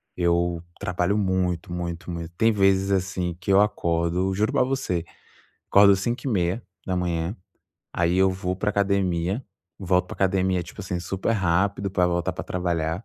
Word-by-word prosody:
Eu 85 Hz, -1 st, +1 dB, 0.2 s
trabalho 90 Hz, +3 st, 0 dB
muito, 90 Hz, -3 st, 0 dB
muito, 85 Hz, 0 st, -4 dB
muito. 85 Hz, 0 st, -5 dB
Tem 115 Hz, 0 st, +4 dB
vezes, 95 Hz, -1 st, +2 dB
assim, 90 Hz, -2 st, -1 dB
que 95 Hz, +3 st, -2 dB
eu 95 Hz, -, +6 dB
acordo, 85 Hz, -1 st, 0 dB
juro 105 Hz, +3 st, +1 dB
pra -, -, +3 dB
você, 125 Hz, -11 st, -1 dB, 0.7 s
acordo 100 Hz, 0 st, +7 dB
5h30, 90 Hz, -, -2 dB, 0.6 s
aí 85 Hz, +1 st, +1 dB
eu 95 Hz, 0 st, +5 dB
vou 90 Hz, 0 st, -2 dB
pra 105 Hz, +1 st, 0 dB
academia. 100 Hz, 0 st, 0 dB, 0.4 s
Volto 90 Hz, -1 st, +1 dB
para -, -, -8 dB
academia, 95 Hz, -1 st, +1 dB
tipo 85 Hz, +5 st, -10 dB
assim, 90 Hz, -2 st, -3 dB
super 95 Hz, +6 st, -2 dB
rápido, 100 Hz, +1 st, +1 dB
pra 90 Hz, -2 st, +2 dB
voltar 85 Hz, -1 st, 0 dB
pra -, -, -6 dB
trabalhar. 85 Hz, +1 st, -2 dB
90 Hz, 145 wpm, -24 LUFS, 85-100 Hz, 0.7 s, acordo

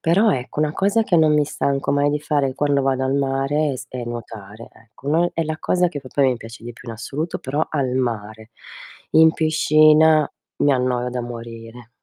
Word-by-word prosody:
Però 195 Hz, +7 st, +3 dB
ecco 130 Hz, +1 st, -5 dB
una 150 Hz, -1 st, +1 dB
cosa 200 Hz, +6 st, +1 dB
che 180 Hz, -, +2 dB
non 155 Hz, -2 st, +4 dB
mi 150 Hz, -, +3 dB
stanco 140 Hz, -1 st, -1 dB
mai 145 Hz, 0 st, +2 dB
di 150 Hz, -, -1 dB
fare 145 Hz, -3 st, 0 dB
quando 145 Hz, -1 st, +1 dB
vado 135 Hz, -1 st, 0 dB
al 130 Hz, +1 st, 0 dB
mare 140 Hz, +2 st, 0 dB
è 130 Hz, -, -4 dB
s 125 Hz, -, -9 dB
è 125 Hz, -1 st, -6 dB
nuotare 115 Hz, -2 st, -8 dB
ecco; 115 Hz, +4 st, -13 dB
noi 170 Hz, +4 st, +2 dB
è 165 Hz, -, 0 dB
la 155 Hz, 0 st, -4 dB
cosa 180 Hz, 0 st, +1 dB
che 150 Hz, -4 st, -6 dB
proprio 135 Hz, 0 st, +1 dB
mi 125 Hz, -, -2 dB
piace 115 Hz, 0 st, -12 dB
di 120 Hz, -, -7 dB
più 120 Hz, +1 st, -14 dB
in 115 Hz, -, -5 dB
assoluto 145 Hz, +8 st, -4 dB
però 145 Hz, +4 st, -2 dB
al 140 Hz, -4 st, -1 dB
mare. 110 Hz, -3 st, -3 dB, 0.6 s
In 160 Hz, 0 st, +6 dB
piscina 155 Hz, -1 st, +4 dB, 0.3 s
mi 145 Hz, -, +4 dB
annoio 125 Hz, -1 st, 0 dB
da 125 Hz, 0 st, -3 dB
morire. 115 Hz, 0 st, -9 dB
135 Hz, 205 wpm, -21 LUFS, 120-155 Hz, 0.6 s, In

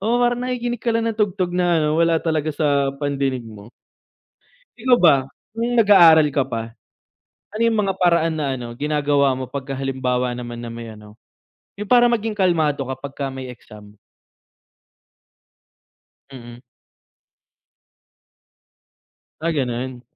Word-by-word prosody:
Oo 225 Hz, +4 st, +1 dB
parang 240 Hz, 0 st, +1 dB
nakikinig 245 Hz, -2 st, -3 dB
ka 235 Hz, -, 0 dB
lang 230 Hz, -, -1 dB
ng 225 Hz, -1 st, -5 dB
tugtog 195 Hz, -3 st, 0 dB
na 180 Hz, 0 st, +1 dB
ano, 150 Hz, -, +1 dB
wala 165 Hz, 0 st, +3 dB
talaga 155 Hz, -2 st, 0 dB
sa 140 Hz, -2 st, +1 dB
pandinig 135 Hz, -3 st, -2 dB
mo. 110 Hz, 0 st, -12 dB, 1.1 s
Ikaw 245 Hz, +1 st, +3 dB
ba, 165 Hz, -5 st, +7 dB, 0.4 s
nung 235 Hz, +1 st, -1 dB
nag-aaral 175 Hz, -9 st, +6 dB
ka 140 Hz, -2 st, 0 dB
pa, 115 Hz, -3 st, -5 dB, 0.9 s
ano 220 Hz, -, -1 dB
'yung 230 Hz, -1 st, +2 dB
mga 195 Hz, -2 st, 0 dB
paraan 170 Hz, -3 st, +2 dB
na 140 Hz, -4 st, -2 dB
ano 120 Hz, -1 st, -7 dB
ginagawa 145 Hz, 0 st, +1 dB
mo 130 Hz, -, -5 dB
'pagka 135 Hz, +1 st, -7 dB
halimbawa 125 Hz, -2 st, -1 dB
naman 120 Hz, -1 st, -7 dB
na 120 Hz, -, -7 dB
may 115 Hz, -1 st, -8 dB
ano, 105 Hz, 0 st, -15 dB, 0.6 s
'yung 210 Hz, -, -5 dB
para 240 Hz, +2 st, +5 dB
maging 225 Hz, -2 st, -1 dB
kalmado 165 Hz, -8 st, +1 dB
ka 130 Hz, -, -3 dB
pagka 140 Hz, 0 st, -6 dB
may 130 Hz, 0 st, -7 dB
exam? 105 Hz, -3 st, -15 dB, 2.4 s
Mm. 120 Hz, -2 st, -11 dB, 2.8 s
Ah, 165 Hz, +1 st, 0 dB
ganun. 125 Hz, -2 st, -3 dB
145 Hz, 135 wpm, -21 LUFS, 130-195 Hz, 2.8 s, ba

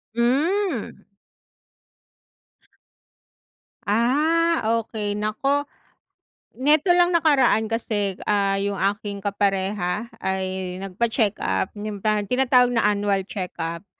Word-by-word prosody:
Mm. 285 Hz, -, 0 dB, 2.8 s
Ah, 305 Hz, +10 st, +2 dB, 0.2 s
okey, 210 Hz, -2 st, -4 dB
naku, 215 Hz, +7 st, 0 dB, 1.0 s
neto 295 Hz, +6 st, +3 dB
lang 350 Hz, 0 st, +3 dB
nakaraan 275 Hz, -9 st, +3 dB
kasi 205 Hz, -4 st, -2 dB
ah, 200 Hz, -1 st, +1 dB
yung 200 Hz, 0 st, -2 dB, 0.2 s
aking 205 Hz, -1 st, -7 dB
kapareha 195 Hz, 0 st, -1 dB, 0.2 s
ay 190 Hz, -1 st, -3 dB
nagpa-check-up, 210 Hz, 0 st, -1 dB
yung 205 Hz, -1 st, -6 dB
tinatawag 245 Hz, +4 st, +2 dB
na 230 Hz, -3 st, +2 dB
annual 200 Hz, -1 st, 0 dB
checkup, 170 Hz, -3 st, -5 dB
210 Hz, 80 wpm, -23 LUFS, 195-255 Hz, 2.8 s, neto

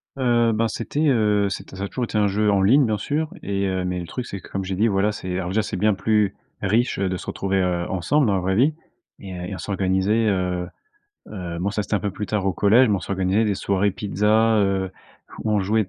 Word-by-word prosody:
Heu, 120 Hz, -3 st, +2 dB
ben, 115 Hz, +1 st, +1 dB
c'était, 145 Hz, +8 st, -1 dB
heu, 105 Hz, -4 st, +2 dB
c'était 95 Hz, -, -7 dB
ça 95 Hz, -, -5 dB
a -, -, -2 dB
toujours 125 Hz, +2 st, -3 dB
été 105 Hz, -, -3 dB
un 105 Hz, -1 st, +3 dB
jeu 105 Hz, +1 st, +1 dB
en 100 Hz, -1 st, +3 dB
ligne 130 Hz, +8 st, +5 dB
bien 110 Hz, -2 st, 0 dB
sûr 155 Hz, +8 st, -2 dB
et, 100 Hz, 0 st, -1 dB
heu 95 Hz, -1 st, -1 dB
mais 90 Hz, 0 st, -2 dB
le 85 Hz, -, -6 dB
truc, 125 Hz, -2 st, -5 dB
c'est 100 Hz, -, -6 dB
que, -, -, -14 dB
comme 95 Hz, -1 st, -3 dB
j'ai 95 Hz, 0 st, -3 dB
dit 110 Hz, +4 st, +2 dB
voilà 100 Hz, +1 st, +2 dB
c'est, 95 Hz, -2 st, -5 dB
alors 90 Hz, -1 st, -3 dB
déjà 110 Hz, +3 st, +1 dB
c'est 100 Hz, -, -4 dB
bien 105 Hz, +2 st, +3 dB
plus 105 Hz, 0 st, +1 dB, 0.3 s
riche, 110 Hz, +5 st, +1 dB
heu, 95 Hz, -1 st, 0 dB
de 95 Hz, -, -2 dB
se -, -, -9 dB
retrouver, 95 Hz, 0 st, -1 dB
heu, 90 Hz, -1 st, 0 dB
ensemble, 130 Hz, -, +1 dB
dans 100 Hz, -, +2 dB
la 95 Hz, -, +1 dB
vraie 95 Hz, +1 st, 0 dB
vie 140 Hz, +7 st, +3 dB, 0.5 s
et, 95 Hz, -2 st, -8 dB
heu, 90 Hz, 0 st, -6 dB
et -, -, -5 dB
on -, -, -5 dB
s'organisait, 100 Hz, +3 st, +1 dB
heu, 90 Hz, -2 st, 0 dB, 0.6 s
heu 90 Hz, -4 st, -5 dB
bon 100 Hz, +3 st, -1 dB
ça 105 Hz, -, -1 dB
c'était 105 Hz, -, -2 dB
un -, -, +1 dB
peu 100 Hz, 0 st, -2 dB
plus 105 Hz, 0 st, -5 dB
tard 100 Hz, -1 st, -1 dB
au 95 Hz, -, +1 dB
collège, 115 Hz, +7 st, +5 dB
mais 105 Hz, -, +2 dB
on -, -, -5 dB
s'organisait 95 Hz, +4 st, 0 dB
des 100 Hz, -2 st, 0 dB
soirées 100 Hz, +1 st, +1 dB
pizzas, 105 Hz, +3 st, +2 dB
heu, 95 Hz, -1 st, 0 dB, 0.5 s
ou, 110 Hz, -, 0 dB
on 105 Hz, -, +3 dB
jouait 105 Hz, +3 st, +1 dB
100 Hz, 260 wpm, -23 LUFS, 95-110 Hz, 0.6 s, ligne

